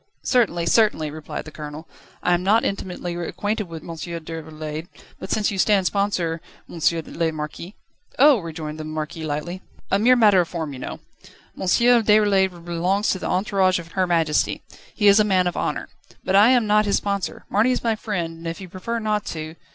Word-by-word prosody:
"Certainly, 195 -10 +2
certainly," 170 -5 +2
replied 155 0 -7
the 155 - -9
Colonel. 150 +2 -8 0.4
"I 180 - +3
am 175 - +1
not 210 +5 +3
intimately 180 -3 -3
acquainted 205 +4 -3
with 165 -2 -8
M. - - -11
Déroulède, 160 -1 -6 0.3
but 190 - -7
since 215 -1 +1
you 195 - -4
stand 200 -1 +3
sponsor, 180 -5 0 0.3
M. 170 - -9 0.3
le 165 -1 -1
Marquis 155 +5 -7 0.2
..." - - -30
"Oh!" 275 -2 +6
rejoined 160 -3 -6
the - - -4
Marquis, 155 +1 -5
lightly, 155 +5 -4 0.3
"a 195 - +3
mere 250 +4 +5
matter 210 -6 +5
of 170 - -3
form, 160 -5 -4
you 130 - -8
know. - - -7 0.5
M. 190 - -5
Déroulède 210 -6 +3
belongs 180 +5 0
to 190 - -2
the - - -4
entourage 190 -1 +2
of 170 -1 -8
Her 185 0 0
Majesty. 165 -3 +1 0.3
He 210 - +1
is 200 +1 +7
a - - +6
man 190 -3 +2
of 175 - -1
honour. - - -2 0.4
But 190 - 0
I 205 +4 +7
am 250 -3 +4
not 210 0 +3
his 200 - +2
sponsor. 200 -2 -3
Marny 215 +5 +2
is 250 - -1
my 230 -2 +1
friend, 175 -7 -4
and 165 +1 -8
if 165 - -4
you 190 -2 -9
prefer 190 +6 -4
not 215 -2 -1
to 155 -1 -5
180 Hz, 195 wpm, -22 LUFS, 165-210 Hz, 0.5 s, is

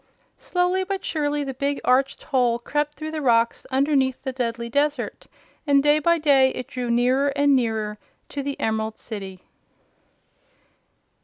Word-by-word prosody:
Slowly 360 +1 0
but 390 0 -4
surely 295 -2 -1
the 270 -1 -4
big, 280 +2 -2
arched 265 +2 +2
hole 245 -3 +1
crept 295 +5 -2
through 310 0 -6
the 315 -1 -4
rocks 235 -3 +2
underneath 270 -1 +1
the 265 - -2
deadly 235 -2 -3
desert, 285 +1 -1 0.4
and 280 -1 +4
day 295 +1 +4
by 340 +3 +3
day 280 -4 +4
it 255 - -5
drew 250 -1 -4
nearer 250 +4 +2
and 285 -1 +4
nearer 220 -4 -1 0.3
to 285 - -4
the 280 0 -4
Emerald 220 0 -1
City. 195 -4 -8
270 Hz, 150 wpm, -23 LUFS, 235-295 Hz, 0.4 s, and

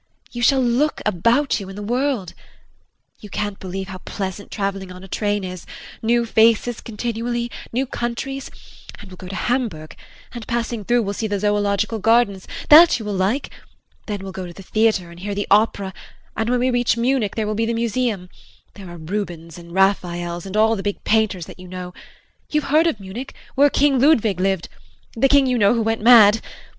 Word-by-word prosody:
You 240 - -6
shall 265 +1 +4
look 250 +6 +1
about 230 - +2
you 195 -2 -8
in 195 - -9
the 205 - -6
world. 245 -4 -1 0.9
You 210 - -11
can't 205 0 -3
believe 190 +1 -6
how 185 -1 -7
pleasant 195 +1 -6
traveling 195 -2 -3
on 180 +1 -11
a - - -10
train 205 +1 -1
is 185 -1 -7 0.3
new 235 +1 +2
faces 225 +1 +2
continually, 235 +1 -3 0.2
new 255 +3 0
countries 260 +3 -4 0.5
and 200 -2 -13
we'll 185 - -11
go 185 - -10
to 195 - -6
Hamburg 220 -11 -2 0.4
and 235 -3 -8
passing 235 -2 -2
through 240 +3 +2
we'll 200 0 -3
see 220 +2 -3
the 205 -1 -2
zoological 205 +1 0
gardens 220 -3 +2 0.2
that 320 +1 +9
you 220 - -7
will 210 - -3
like 200 +9 -1 0.6
then 205 -2 -4
we'll 195 - -6
go 185 -1 -6
to 175 - -10
the 195 - -12
theatre 215 -4 +1
and 170 - -13
hear 200 +2 -4
the 205 - -2
opera 200 -2 +2 0.4
and 225 +1 -1
when 250 0 +1
we 255 +1 +2
reach 245 -1 +1
Munich 235 -3 0
there 220 - -1
will 210 - -2
be 225 +1 -1
the - - 0
museum 230 -4 -1 0.5
there 195 -3 -11
are 175 - -9
Rubins 170 -1 -5
and 170 0 -13
Raphaels 175 -2 0
and 195 +2 -4
all 220 +1 +4
the 195 - -4
big 205 0 -4
painters 215 -6 +1
that - - -13
you 185 - -11
know 180 0 -7 0.6
you 300 - +1
have - - -7
heard 315 +3 +5
of 275 -11 -1
Munich 200 +8 -8 0.2
where 285 +2 +5
King 280 -1 +2
Ludwig 230 - +3
lived 190 -2 0 0.5
the 270 +4 +3
King, 280 -1 +5
you 250 -2 +1
know, 205 +2 +4
who 230 - +1
went 225 0 -1
mad. 225 -2 +7
210 Hz, 200 wpm, -21 LUFS, 190-240 Hz, 0.9 s, that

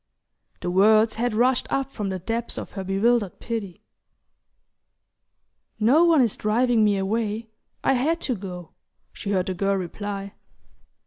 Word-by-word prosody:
The 175 - -2
words 215 +4 +5
had 240 -1 0
rushed 245 +2 +2
up 275 0 -1
from 205 -5 -4
the 190 - -2
depths 230 +6 -3
of - - -6
her 195 - -5
bewildered 200 +2 +1
pity. 215 -6 -5 2.0
"No 265 +10 +5
one 325 -6 +5
is 230 - 0
driving 230 +1 +2
me 205 -1 +3
away: 215 +3 -2 0.3
I - - +3
had 300 +7 +1
to 255 - 0
go," 180 -5 -7 0.4
she 200 - -6
heard 185 -3 +1
the 190 - -2
girl 195 +2 0
reply. 195 +2 -5
215 Hz, 145 wpm, -24 LUFS, 195-240 Hz, 2.0 s, words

